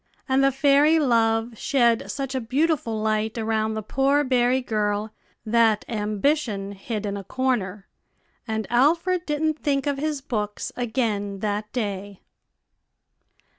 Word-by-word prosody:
And 265 0 +3
the 275 - +4
fairy 285 +3 +4
Love 230 -4 +1
shed 235 -4 +2
such 275 -1 -4
a 260 - -1
beautiful 260 -2 0
light 215 +1 -1
around 220 -1 0
the 215 - -4
poor 275 +6 +2
berry 255 -1 +2
girl, 210 -3 -1 0.3
that 225 -1 +3
Ambition 210 -1 -1
hid 210 +2 -5
in 200 -1 -2
a 200 - -6
corner, 210 -5 -2 0.6
and 220 -1 -2
Alfred 335 +8 +2
didn't 310 +1 0
think 275 -1 0
of 285 -1 -1
his 300 -1 -1
books 210 -6 -3
again 220 -5 -1
that 210 0 -2
day. 200 -4 -4
235 Hz, 130 wpm, -24 LUFS, 215-275 Hz, 0.6 s, the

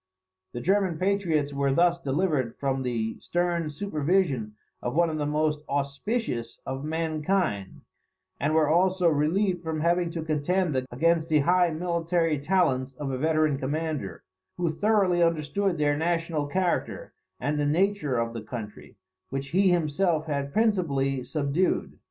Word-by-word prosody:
The 120 - -4
German 190 -1 +1
patriots 170 -6 0
were 140 0 +1
thus 175 +4 +3
delivered 145 -4 -1
from 135 -1 -1
the 115 -3 -2
stern 175 -2 -1
supervision 150 - 0 0.3
of 120 +3 -3
one 170 0 +3
of 155 - -3
the 145 - -1
most 150 0 0
auspicious 140 - -2
of 135 +1 -4
mankind, 155 - -1 0.6
and 150 +3 +1
were 155 -2 +4
also 180 +3 +3
relieved 175 +5 +1
from 160 -2 -3
having 170 +1 +2
to 165 -1 -4
contend 155 -2 0
against 165 +5 +1
the 155 -2 +4
high 175 +3 +3
military 165 -1 0
talents 140 -5 +1
of 135 +1 -5
a 130 - -2
veteran 155 -2 +2
commander, 145 - -3 0.3
who 175 -2 0
thoroughly 195 -1 +2
understood 170 +3 +1
their 145 -1 +2
national 165 -1 -1
character, 180 +4 -1 0.3
and 145 +3 -1
the 145 - +1
nature 165 -4 +1
of 115 0 -1
the 115 - -5
country, 110 -2 -8 0.3
which 135 +1 -4
he 190 +4 +3
himself 165 -1 +1
had 140 -2 -2
principally 140 - +1
subdued. 150 +5 -1
155 Hz, 145 wpm, -27 LUFS, 140-175 Hz, 0.6 s, were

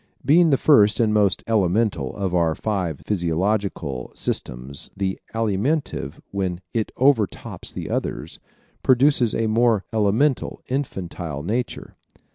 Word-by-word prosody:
Being 165 +3 +5
the 135 - +4
first 105 -9 +5
and 110 -2 +3
most 100 -3 +2
elemental 100 - +1
of 95 -3 -2
our 85 -3 +2
five 95 -8 -2
physiological 90 -6 -1
systems 65 +3 -3
the 95 -1 -2 0.2
Alimentive 110 - -1
when 95 -3 -2
it 110 -2 -1
overtops 125 -6 +1
the - - -6
others - - -3 0.4
produces 130 -2 +3
a 115 - 0
more 110 -2 +2
elemental, 110 +6 +1
infantile 90 - -4
nature. 115 +7 -3
105 Hz, 115 wpm, -23 LUFS, 90-115 Hz, 0.4 s, Being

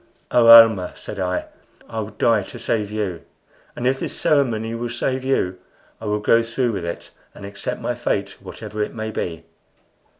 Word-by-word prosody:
"Oh, 120 -1 +4
Almah," 115 -5 +8
said 105 - -8
I, 90 -1 -1 0.4
"I 115 - -5
would 110 0 -6
die 115 -3 +3
to 100 - -9
save 110 -3 -1
you! 100 -6 -3 0.5
and 120 - -5
if 135 +1 +2
this - - -4
ceremony 120 -8 +1
will 120 +1 -3
save 130 +2 -2
you 95 -9 0 0.4
I - - -7
will 105 0 0
go 115 +2 +4
through 115 +1 -1
with 95 -5 -4
it, 85 - -6 0.2
and - - -10
accept 100 0 -5
my - - -1
fate - - -2
whatever 105 - -7
it 105 - -3
may 110 -1 -4
be." 85 -5 -4
110 Hz, 180 wpm, -21 LUFS, 100-120 Hz, 0.5 s, Almah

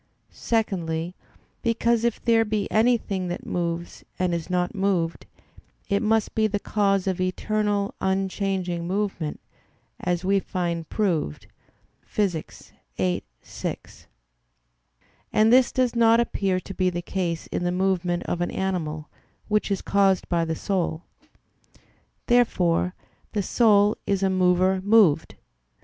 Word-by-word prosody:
Secondly, 175 -7 -1 0.5
because 230 -1 +1
if 235 -2 0
there 230 -1 +4
be 210 -1 -1
anything 215 -5 +1
that 175 - -5
moves 170 -1 -3
and 180 -1 0
is 170 0 -3
not 180 -1 0
moved, 190 -5 -1 0.6
it 200 -1 +2
must 220 -1 +1
be 220 -1 +2
the 205 -1 -1
cause 200 -2 +1
of 190 -1 -1
eternal, 205 +2 0
unchanging 190 -2 -1
movement, 190 -5 -2 0.6
as 180 0 -1
we 195 +1 +3
find 170 -3 -3
proved 170 - -1 0.6
Phys. 185 -7 -3 0.3
viii, 90 -2 0 0.2
6; - - -7 1.2
and 220 +2 +4
this 255 -1 +5
does 250 -2 +1
not 230 0 +5
appear 195 -5 0
to 195 - -9
be 185 -1 +1
the 175 -1 -4
case 175 -3 -2
in - - -2
the 175 - 0
movement 180 -1 0
of 175 - -3
an 175 - 0
animal, 160 -5 -3 0.4
which 210 0 +1
is 200 - -1
caused 195 -2 +2
by 170 -1 +1
the 160 0 -2
soul. 175 -3 -2 1.2
Therefore 180 -7 +2 0.4
the 205 -2 0
soul 210 -1 +4
is 195 -1 +1
a 190 - +2
mover 185 0 +3
moved. 195 -7 +4
190 Hz, 130 wpm, -25 LUFS, 175-210 Hz, 1.2 s, this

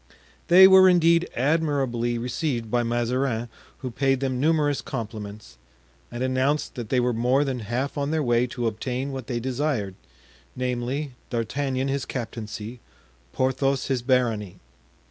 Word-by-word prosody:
They 190 +2 +9
were 190 0 +8
indeed 170 -1 +4
admirably 135 -5 0
received 120 -1 -3
by 120 0 +2
Mazarin, 120 0 -1 0.3
who 130 - -4
paid 135 +1 +1
them 130 -2 -1
numerous 150 -1 +2
compliments, 105 - -7 0.5
and 120 +1 -4
announced 130 +3 0
that 120 -4 -6
they 130 - +2
were 125 0 +1
more 125 +5 +2
than 135 -3 -2
half 125 +6 -3
on 140 0 -1
their 155 -1 0
way 120 -1 +2
to 120 0 -4
obtain 125 +5 -2
what 130 -3 -6
they 120 -2 -2
desired, 125 -5 -2 0.6
namely, 125 +3 -2 0.2
D'Artagnan 130 +3 -1
his 135 -1 -1
captaincy, 115 -1 -6 0.5
Porthos 130 - 0
his 130 -2 0
barony. 120 -6 0
130 Hz, 140 wpm, -25 LUFS, 120-140 Hz, 0.6 s, They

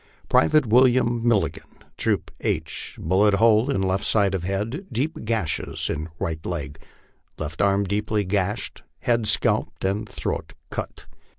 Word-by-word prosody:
" - - -31
Private 140 - +4
William 120 0 +4
Milligan, 110 -4 0 0.2
Troop - - -1
II, - - +1 0.3
bullet 100 +2 +3
hole 110 +4 +4
in 115 -9 0
left 95 +1 0
side 100 -3 +3
of 95 - -1
head, 105 - -3
deep 135 +6 -2
gashes 105 -9 0
in 80 +3 -4
right 80 -1 -3
leg,.... 75 -5 -5 0.6
left 80 +1 -4
arm 100 0 +3
deeply 105 +1 -1
gashed, 100 +3 -1 0.2
head 115 -3 +1
scalped, - - +1
and 100 +3 -1
throat - - -4 0.2
cut. - - -6
105 Hz, 140 wpm, -24 LUFS, 95-115 Hz, 0.6 s, Private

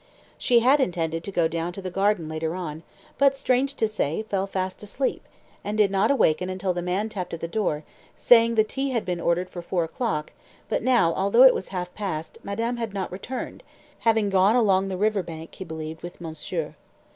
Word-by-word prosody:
She 240 -2 +4
had 265 +5 +5
intended 165 - -1
to 200 - -4
go 170 -3 +2
down 165 +2 -3
to 195 - -7
the 185 -1 -5
garden 195 -3 +1
later 160 +1 -3
on, 160 -4 -5 0.4
but, 275 -1 +4
strange 270 +1 +1
to 220 - +1
say, 210 -3 -1
fell 195 -3 -2
fast 185 -1 -3
asleep, 235 +6 -2 0.4
and 210 +1 -3
did 205 -2 +4
not 195 0 +2
awaken 185 - +2
until 185 0 -1
the 175 - -3
man 185 +5 -1
tapped 185 -6 -5
at 165 - -11
her - - -1
door, 170 -6 -1 0.3
saying 230 -1 +5
the 215 - +5
tea 270 +5 -2
had 240 -4 -1
been 175 -2 -2
ordered 170 +2 +1
for 175 - -7
four 175 0 -1
o'clock, 165 - -3 0.4
but - - 0
now, 240 -10 +3
although 200 +8 +4
it 265 - +9
was - - -4
half 180 -2 -5
past, 165 -7 -5
madame 230 +4 -2
had 230 -3 -4
not 190 -1 -3
returned, 240 +8 -6 0.4
having 220 -3 +2
gone 195 +4 +4
along 195 -5 +3
the 190 -1 -3
river 210 0 +2
bank, 165 -2 -9
he - - -7
believed, 160 -1 -7
with 175 - -9
monsieur. 160 -2 -4
190 Hz, 205 wpm, -25 LUFS, 170-220 Hz, 0.4 s, it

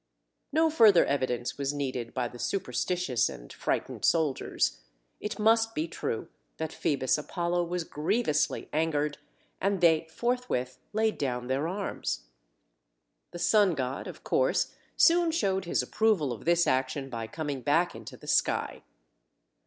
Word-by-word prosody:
No 320 +2 +3
further 220 - +6
evidence 130 -2 -1
was 140 +1 -1
needed 130 -4 -3
by 125 -2 -1
the 120 - -11
superstitious 180 - 0
and - - -10
frightened - - -2
soldiers. 155 -5 +1 0.4
It 210 - -4
must 225 +1 +3
be 155 +2 -1
true 115 -8 -4 0.3
that 160 -1 -4
Phoebus 135 -1 +1
Apollo 175 +3 -1
was 175 0 -2
grievously 160 +1 0
angered, 150 -2 0 0.4
and 195 0 +1
they 165 -2 +4
forthwith 235 - -2
laid 220 +1 0
down 125 -3 -2
their 135 +5 0
arms. 195 +3 -3 1.1
The 175 - -8
sun 185 +1 +4
god, 130 -1 -3
of - - -9
course, - - +1 0.2
soon 340 0 +5
showed 195 - 0
his 170 - +1
approval 200 - +1
of 110 - -10
this 170 +1 +4
action 130 +1 0
by 115 -3 -5
coming 145 +1 -4
back 165 +6 +2
into - - -10
the - - -15
sky. - - +1
160 Hz, 140 wpm, -29 LUFS, 135-200 Hz, 1.1 s, further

